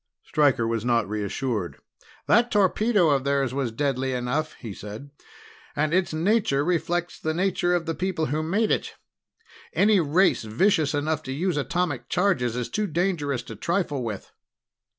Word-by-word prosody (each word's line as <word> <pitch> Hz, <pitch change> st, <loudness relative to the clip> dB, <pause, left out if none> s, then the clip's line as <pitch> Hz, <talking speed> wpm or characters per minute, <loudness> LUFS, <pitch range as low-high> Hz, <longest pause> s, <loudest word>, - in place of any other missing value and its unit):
Stryker 140 Hz, -6 st, +2 dB
was 115 Hz, -1 st, -1 dB
not 120 Hz, -2 st, +1 dB
reassured. 105 Hz, 0 st, -3 dB, 0.5 s
"That 235 Hz, +2 st, +4 dB
torpedo 205 Hz, -3 st, +3 dB
of 135 Hz, -2 st, +2 dB
theirs 140 Hz, -2 st, 0 dB
was 135 Hz, -4 st, -1 dB
deadly 130 Hz, +1 st, -1 dB
enough," 125 Hz, +6 st, -2 dB
he 110 Hz, -5 st, -8 dB
said. 105 Hz, +9 st, -9 dB, 0.6 s
"And 155 Hz, +2 st, 0 dB
its 185 Hz, 0 st, +2 dB
nature 160 Hz, -4 st, +1 dB
reflects 175 Hz, 0 st, -1 dB
the 160 Hz, 0 st, -2 dB
nature 180 Hz, -1 st, +1 dB
of 170 Hz, -2 st, -1 dB
the 165 Hz, -, -1 dB
people 180 Hz, -2 st, -1 dB
who 155 Hz, +1 st, -1 dB
made 200 Hz, +8 st, 0 dB
it. -, -, -1 dB, 0.8 s
Any 205 Hz, 0 st, +4 dB
race 175 Hz, +4 st, +3 dB
vicious 150 Hz, -, +2 dB
enough 155 Hz, +1 st, -1 dB
to 130 Hz, -, -7 dB
use 170 Hz, +5 st, -1 dB
atomic 145 Hz, -4 st, -2 dB
charges 175 Hz, -, +1 dB
is 125 Hz, -1 st, -2 dB
too 210 Hz, -1 st, -2 dB
dangerous 155 Hz, -7 st, -1 dB
to 115 Hz, -, -9 dB
trifle 170 Hz, -, -1 dB
with." 110 Hz, -5 st, -5 dB
150 Hz, 155 wpm, -25 LUFS, 125-180 Hz, 0.8 s, That